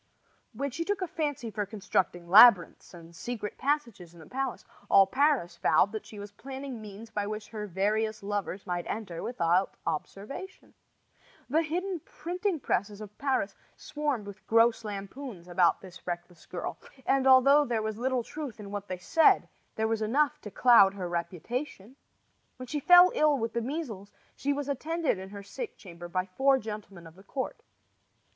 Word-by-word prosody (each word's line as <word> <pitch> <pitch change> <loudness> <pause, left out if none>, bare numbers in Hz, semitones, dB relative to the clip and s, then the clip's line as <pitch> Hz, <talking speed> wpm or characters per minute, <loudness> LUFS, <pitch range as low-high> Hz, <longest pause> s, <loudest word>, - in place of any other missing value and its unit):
When 280 0 -3
she 335 - -3
took 395 +1 -1
a - - -2
fancy 290 -8 -3
for 210 0 -2
constructing 190 -4 -2
labyrinths 195 -2 +7
and 170 -1 -13
secret 220 0 -5
passages 235 - -2
in - - -15
the 160 - -12
palace, 265 - -4 0.2
all 195 - +7
Paris 255 - +1
vowed 155 +6 +3
that 220 - -6
she 215 - -11
was 205 0 -8
planning 265 +1 -7
means 215 +2 -10
by 205 -1 -2
which 215 0 -5
her 210 -2 -5
various 215 +3 -1
lovers 200 -1 -3
might 175 -2 -3
enter 200 -6 -5
without 180 -5 +1
observation. 200 - -6 0.8
The 315 +3 +4
hidden 355 +3 -2
printing 355 +3 -3
presses 205 -4 -1
of 210 -1 -10
Paris 260 -8 0 0.2
swarmed 290 -8 -3
with 195 -1 -11
gross 230 +1 +4
lampoons 205 -1 -7
about 175 -1 +3
this 185 -2 -13
reckless 175 0 -6
girl; - - -5 0.3
and, 270 0 +2
although 275 +3 +7
there 235 -5 -1
was 220 0 -3
little 255 0 0
truth 285 -4 -7
in 200 -1 -8
what 205 0 -5
they 185 - -4
said, 315 - +4 0.3
there 220 0 0
was 225 0 -1
enough 290 +7 +1
to 210 - -7
cloud 200 -4 +6
her 185 -3 -4
reputation. 190 - -4 0.6
When 255 - -7
she 295 +4 -3
fell 355 +4 +8
ill 300 -2 +3
with 225 -2 -3
the 235 - -1
measles 230 - -5 0.2
she 285 - -1
was 285 0 -2
attended 305 - -1
in 190 0 -8
her 200 0 -9
sick 435 - -7
chamber 175 -2 -10
by 185 +1 -1
four 265 +8 +3
gentlemen 210 -6 -8
of 165 - -12
the 190 - -17
court. 260 +5 -5
220 Hz, 175 wpm, -29 LUFS, 195-275 Hz, 0.8 s, fell